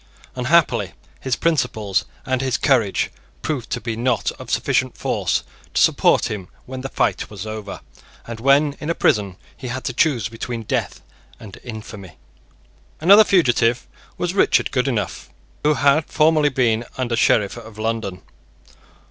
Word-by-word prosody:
Unhappily 145 +6 +2 0.3
his 130 -2 -1
principles 125 - 0 0.2
and 130 0 0
his 130 -2 0
courage 120 -9 +1 0.3
proved 135 -6 -3
to - - -2
be 115 -2 -4
not 120 -3 0
of - - -9
sufficient - - 0
force - - -1 0.3
to - - +3
support - - +3
him 100 -4 -5 0.2
when 130 0 -7
the 135 - -5
fight - - -1
was 105 -1 -7
over, 110 -2 -6 0.4
and 115 -1 -7
when 140 +3 +3
in 150 - -5
a 170 - 0
prison, 100 -4 +1 0.2
he 130 - -8
had 130 +2 -4
to 130 - -3
choose 130 -4 +1
between 115 0 -5
death - - -2 0.4
and 100 -3 -11
infamy. 105 -6 -9 0.9
Another 200 +7 +8
fugitive 120 - +2 0.3
was 175 0 -2
Richard 195 - +2
Goodenough, 125 -7 -2 0.3
who 150 0 +3
had 145 +2 +3
formerly 155 -1 +3
been 120 -4 +1
Under 125 -2 -1
Sheriff 105 -3 +2
of 110 -2 -11
London. 110 -4 -3
125 Hz, 150 wpm, -21 LUFS, 110-140 Hz, 0.9 s, Another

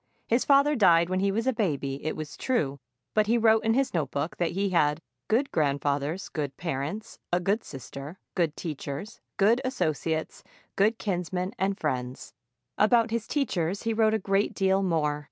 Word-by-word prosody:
His 235 +2 +2
father 285 +1 +5
died 170 -7 +5
when 185 - +1
he 195 +1 +2
was 225 +3 -1
a 260 - +2
baby, 140 - -2
it 155 - -2
was 155 -1 -6
true, 145 - -1 0.3
but 215 -1 +3
he 235 +2 +3
wrote 225 -1 +4
in 225 +1 +2
his 270 0 +1
notebook 145 -1 -2
that 175 -1 0
he 195 +1 0
had 150 -3 +2 0.3
"good 250 +6 +1
grandfathers, 145 +3 0
good 145 -4 -4
parents, 165 +6 -4
a 175 - +3
good 200 +5 0
sister, 140 +4 -8 0.2
good 165 -4 0
teachers, 155 +5 -6 0.2
good 220 +5 +4
associates, 160 - -2 0.3
good 215 +3 +3
kinsmen 180 -1 -2
and 195 +1 0
friends." 130 -6 -3 0.5
About 230 +2 +4
his 230 -1 -2
teachers 200 - -1
he 225 -1 0
wrote 220 0 +3
a - - +3
great 195 0 0
deal 190 0 +2
more. 155 -5 0
185 Hz, 170 wpm, -27 LUFS, 150-220 Hz, 0.5 s, father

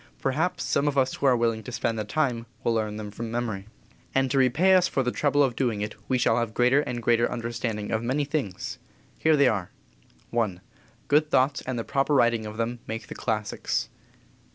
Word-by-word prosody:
Perhaps 140 0 0
some 140 +3 +1
of 145 -1 0
us 130 -1 +2
who 140 - 0
are 125 -2 +5
willing 115 -1 +1
to 125 - -8
spend 115 -2 -1
the - - -1
time 120 0 -1 0.2
will 115 - +2
learn 110 -2 -1
them 105 -1 -6
from 115 +2 -5
memory. 110 -4 -3 0.5
And 135 -1 +2
to 135 - +3
repay 150 +9 +4
us 185 -1 +5
for 135 - 0
the 125 - 0
trouble 145 +1 +2
of 130 -4 0
doing 115 -6 0
it 105 0 -3
we 130 - +2
shall 125 - +2
have 115 -2 -3
greater 125 +3 +4
and 120 -4 -4
greater 120 0 +3
understanding 115 -3 -3
of 110 - 0
many 130 +5 0
things. 135 - -3 0.4
Here 160 -1 +4
they 140 -2 +5
are: 100 -7 0 0.7
I. 110 -6 +1 0.5
Good 150 +1 +3
thoughts 135 +1 +2
and 130 -1 -2
the 115 - -2
proper 140 +4 +1
writing 120 -4 +3
of 105 +1 -8
them 115 +1 -2
make 110 +1 -4
the - - -5
classics. 105 -1 -2
120 Hz, 210 wpm, -26 LUFS, 110-135 Hz, 0.7 s, are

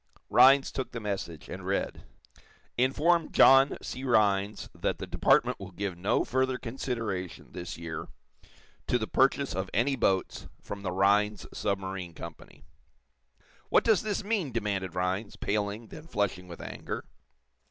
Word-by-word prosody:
Rhinds 135 +1 +6
took 130 - -4
the 115 - -3
message, 95 -7 -4
and - - -7
read: - - -2 0.7
_"Inform 155 +6 +2
John 135 +1 +6
C. 130 - -6
Rhinds 105 -5 +2
that - - -2
the - - -5
Department - - +2
will 95 -2 -7
give 95 0 -4
no 90 +4 +1
further 130 0 +1
consideration, 115 -8 -4
this 90 -1 -6
year, 80 -1 -6 0.8
to 125 - +3
the 110 - -2
purchase 135 +3 +2
of 95 0 -3
any 135 +5 +2
boats 95 -6 0
from 100 0 -7
the 95 -2 -3
Rhinds 100 +3 +2
Submarine 95 -3 -3
Company."_ - - -11 1.1
"What - - +4
does 220 -4 +4
this 215 -1 -2
mean!" 200 - -1
demanded 100 -5 -2
Rhinds, 95 +3 -1
paling, 105 +2 -2
then 155 +1 -11
flushing 95 - -1
with 85 -1 -9
anger. - - -6
105 Hz, 140 wpm, -29 LUFS, 95-130 Hz, 1.1 s, Rhinds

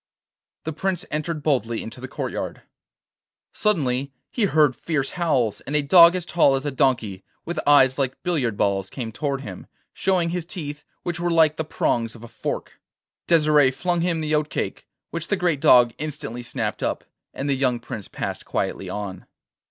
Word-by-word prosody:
The 160 - -3
Prince 185 +3 -2
entered 155 0 -2
boldly 120 -6 0
into 115 +3 -9
the 130 - -5
courtyard. - - -4 0.9
Suddenly 140 -9 0 0.2
he 230 - +1
heard 150 -7 +3
fierce 140 -1 -1
howls, 135 - 0
and 145 - -4
a 150 - +3
dog 170 +4 +8
as 180 -2 -2
tall 160 -6 +4
as 135 +2 -3
a 145 - 0
donkey, 120 -8 0 0.2
with 170 -1 -3
eyes 135 -2 +6
like 135 -1 0
billiard 135 - 0
balls, 100 -1 0
came 120 -4 -5
towards 140 +2 -2
him, 95 -6 -8 0.3
showing 180 -3 +1
his 180 -1 -2
teeth, 150 -4 -6 0.2
which 175 -1 -3
were 175 0 0
like 160 -2 +4
the 160 - -1
prongs 115 -6 -1
of 115 - -12
a - - -8
fork. - - -5 0.5
Desire 150 -4 +5
flung 175 +5 -1
him 170 -2 0
the 155 0 -1
oat 150 0 +1
cake, - - -4 0.2
which 165 0 -4
the 205 - +1
great 175 -6 0
dog 120 -2 +6
instantly 150 -5 -5
snapped 120 -3 -3
up, - - -1 0.3
and 140 - -4
the 140 - +2
young 130 -2 +1
Prince 110 -3 -7
passed - - -5
quietly - - -3
on. 100 -3 -6
145 Hz, 180 wpm, -23 LUFS, 125-165 Hz, 0.9 s, dog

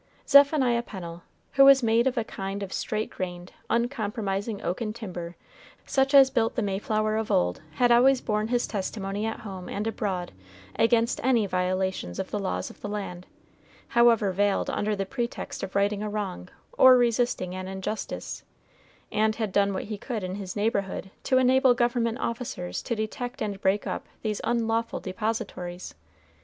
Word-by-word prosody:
Zephaniah 280 -4 +5
Pennel, 175 -6 -8 0.3
who 275 0 +6
was 275 -1 +7
made 230 +2 +3
of 260 0 -1
a 235 - +2
kind 195 -1 -5
of 190 - -6
straight 215 0 -2
grained, 180 -1 -6 0.2
uncompromising 215 -4 -1
oaken 215 +5 -2
timber 180 -6 -7 0.5
such 270 +1 +2
as 270 -1 +8
built 230 -4 +1
the 235 - 0
Mayflower 215 +2 0
of 220 -1 -2
old, 90 0 +1
had 245 -1 +3
always 255 +2 +6
borne 215 -2 -1
his 245 +1 +1
testimony 200 +1 -3
at 225 - -4
home 190 -5 -7
and 205 - -3
abroad 195 -5 -2 0.4
against 230 0 +2
any 240 -4 +3
violations 185 - -1
of 190 - -4
the 210 - -1
laws 195 - -3
of - - -19
the 205 - -5
land, 190 -4 -5 0.6
however 230 -4 +4
veiled 200 +2 +1
under 210 0 -1
the 195 -1 -2
pretext 235 +4 -4
of 190 - -6
righting 200 +1 +1
a 210 - -2
wrong 200 -3 -4 0.3
or 260 -1 +9
resisting 235 -6 +1
an 185 0 -5
injustice, 190 +3 -5 0.7
and 215 0 +2
had 220 -3 -2
done 200 +1 +3
what 190 - -3
he 210 -1 -6
could 225 -4 -4
in 185 0 -3
his 190 -2 -6
neighborhood 200 -3 -1
to 260 - +2
enable 255 0 +5
government 240 -1 +1
officers 230 - -4
to 235 - -2
detect 245 +4 -4
and 205 -2 -3
break 195 +2 +1
up - - -4 0.2
these 215 -2 -2
unlawful 230 -1 0
depositories. 190 -3 -4
215 Hz, 165 wpm, -27 LUFS, 195-235 Hz, 0.7 s, or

